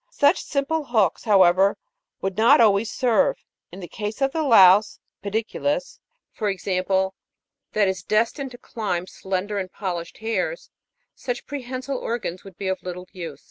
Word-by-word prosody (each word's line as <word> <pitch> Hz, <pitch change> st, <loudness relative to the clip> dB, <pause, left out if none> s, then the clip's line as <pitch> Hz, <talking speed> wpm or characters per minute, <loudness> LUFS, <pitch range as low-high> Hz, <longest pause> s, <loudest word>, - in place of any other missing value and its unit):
" -, -, -46 dB, 0.2 s
Such 290 Hz, +6 st, +5 dB
simple 295 Hz, +2 st, -1 dB
hooks, 215 Hz, -8 st, +1 dB
however, 195 Hz, -2 st, +5 dB, 0.4 s
would 195 Hz, -1 st, -2 dB
not 235 Hz, +7 st, +6 dB
always 215 Hz, -1 st, +4 dB
serve. 245 Hz, -5 st, +2 dB, 0.4 s
In 185 Hz, +3 st, -10 dB
the 175 Hz, -, -7 dB
case 210 Hz, +4 st, -5 dB
of 270 Hz, 0 st, +1 dB
the 320 Hz, -, -1 dB
louse 210 Hz, -7 st, +6 dB, 0.3 s
(pediculus\ 225 Hz, -, -2 dB, 0.3 s
for 210 Hz, -, -2 dB
example, 190 Hz, 0 st, 0 dB, 0.6 s
that 210 Hz, -2 st, +3 dB
is 190 Hz, 0 st, -2 dB
destined 230 Hz, +6 st, 0 dB
to 245 Hz, -, -12 dB
climb 200 Hz, -8 st, -3 dB
slender 195 Hz, +2 st, -3 dB
and 185 Hz, -1 st, -5 dB
polished 175 Hz, -4 st, -5 dB
hairs, -, -, -3 dB, 0.4 s
such 245 Hz, -1 st, -5 dB
prehensile 260 Hz, -1 st, -5 dB
organs 220 Hz, -6 st, -4 dB
would 195 Hz, -3 st, -13 dB
be 195 Hz, -, -4 dB
of 190 Hz, 0 st, -2 dB
little 180 Hz, 0 st, -7 dB
use. 165 Hz, -6 st, -7 dB
210 Hz, 155 wpm, -23 LUFS, 190-245 Hz, 0.6 s, not